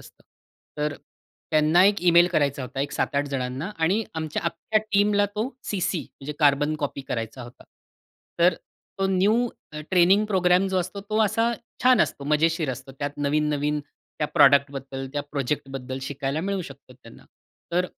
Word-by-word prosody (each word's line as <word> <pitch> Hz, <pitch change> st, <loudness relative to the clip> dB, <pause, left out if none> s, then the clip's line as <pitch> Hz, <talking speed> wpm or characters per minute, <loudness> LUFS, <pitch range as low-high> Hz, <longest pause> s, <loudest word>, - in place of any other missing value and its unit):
असतं. -, -, -18 dB, 0.6 s
तर 150 Hz, -1 st, -1 dB, 0.6 s
त्यांना 155 Hz, +3 st, +4 dB
एक 205 Hz, -1 st, +3 dB
ईमेल 175 Hz, 0 st, +6 dB
करायचा 140 Hz, -5 st, 0 dB
होता 135 Hz, +2 st, -5 dB
एक 145 Hz, -, -2 dB
7-8 140 Hz, +1 st, 0 dB
जणांना 135 Hz, +6 st, -3 dB
आणि 185 Hz, +7 st, +2 dB
आमच्या 160 Hz, -1 st, -3 dB
अक्ख्या 215 Hz, +5 st, 0 dB
टीमला 205 Hz, 0 st, +3 dB
तो 220 Hz, +4 st, -1 dB, 0.2 s
सीसी 185 Hz, -3 st, -1 dB
म्हणजे 145 Hz, +2 st, -9 dB
कार्बन 145 Hz, +1 st, +3 dB
कॉपी 145 Hz, -1 st, -4 dB
करायचा 115 Hz, +2 st, -4 dB
होता. 120 Hz, +1 st, -13 dB, 0.7 s
तर 170 Hz, 0 st, +5 dB, 0.4 s
तो 195 Hz, -, +1 dB
न्यू 210 Hz, +6 st, +2 dB, 0.4 s
ट्रेनिंग 190 Hz, +3 st, +5 dB
प्रोग्राम 185 Hz, -1 st, +3 dB
जो 190 Hz, -1 st, 0 dB
असतो, 185 Hz, +3 st, -4 dB
तो 215 Hz, +2 st, -3 dB
असा 225 Hz, +3 st, +1 dB, 0.3 s
छान 255 Hz, 0 st, +5 dB
असतो 140 Hz, -, -1 dB
मजेशीर 155 Hz, 0 st, +1 dB
असतो. 130 Hz, +2 st, -8 dB
त्यात 145 Hz, 0 st, -2 dB
नवीन-नवीन 150 Hz, 0 st, 0 dB, 0.4 s
त्या 150 Hz, -, 0 dB
प्रॉडक्टबद्दल, 135 Hz, -1 st, +3 dB
त्या 145 Hz, -1 st, -2 dB
प्रोजेक्टबद्दल 135 Hz, -2 st, -3 dB
शिकायला 140 Hz, +2 st, -3 dB
मिळू 195 Hz, 0 st, -2 dB
शकते 140 Hz, -3 st, -12 dB
त्यांना. 115 Hz, -2 st, -16 dB, 0.5 s
तर 180 Hz, +1 st, +2 dB
150 Hz, 150 wpm, -25 LUFS, 140-185 Hz, 0.7 s, ईमेल